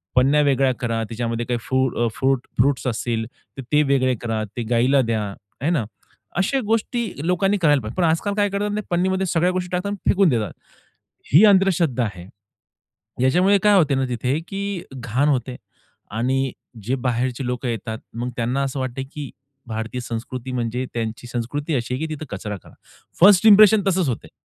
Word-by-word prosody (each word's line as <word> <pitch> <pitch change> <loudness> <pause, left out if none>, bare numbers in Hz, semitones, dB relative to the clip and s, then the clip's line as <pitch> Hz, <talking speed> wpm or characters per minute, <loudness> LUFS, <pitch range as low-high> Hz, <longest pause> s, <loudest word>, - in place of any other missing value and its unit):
पानं 135 +4 +4
वेगळ्या 135 -2 +2
करा 115 -2 -1
त्याच्यामध्ये 115 +1 -3
काही 120 -1 -1
फु 130 +2 +1 0.2
अ, - - +2
फ्रुट 135 -1 0
फ्रुट्स 130 +1 +2
असतील, 115 -1 -1 0.3
तर - - -4
ते 150 0 +5
वेगळे 130 -2 +2
करा, 115 -2 -2
ते 120 - -1
गाईला 125 +4 +4
द्या, 115 -3 -1 0.4
आहे 145 - +1
ना? 145 -10 0 0.5
अशा 195 +9 +1
गोष्टी 225 +1 0 0.2
लोकांनी 195 +3 +2
करायला 150 -6 +3
पाहिजे. 110 +1 -7
पण - - +3
आजकाल 165 +6 0
काय 205 -1 +2
करतात 200 +1 -2
ना 210 - -1
पन्नीमध्ये 190 +2 +1
सगळ्या 175 +1 +2
गोष्टी 180 -1 -3
टाकतात 180 +2 -1
अन् 205 - -4
फेकून 195 -2 +4
देतात. 110 - -1 0.8
ही 165 +8 +8
अंधश्रद्धा 185 - +3
आहे. 90 -4 -7 1.0
याच्यामुळे 180 +9 +4
काय 210 -1 +5
होते 150 -6 +3
ना 135 - +1
तिथे 125 +4 -1
की 195 -2 -4
घाण 130 +3 0
होते 130 -2 -1 0.6
आणि 130 +4 0 0.3
जे 125 +6 0
बाहेरचे 125 0 -1
लोकं 125 +1 -3
येतात, 110 -1 -4 0.2
मग 120 +2 -3
त्यांना 125 +3 0
असं 135 0 -3
वाटते 130 0 -3
की 145 -3 -6 0.4
भारतीय 115 +2 -4
संस्कृती 120 +2 -5
म्हणजे 125 0 -2
त्यांची 115 +1 -4
संस्कृती 140 +6 -3
अशी 120 -1 -2
आहे 140 +5 -2
की 155 - -4
तिथे 155 - -8
कचरा 105 +1 -5
करा. - - -18 0.5
फर्स्ट 195 +2 +7
इंप्रेशन 210 0 +8
तसंच 185 -6 +2
होते 120 - -4
आहे. - - -22
130 Hz, 180 wpm, -22 LUFS, 120-180 Hz, 1.0 s, ही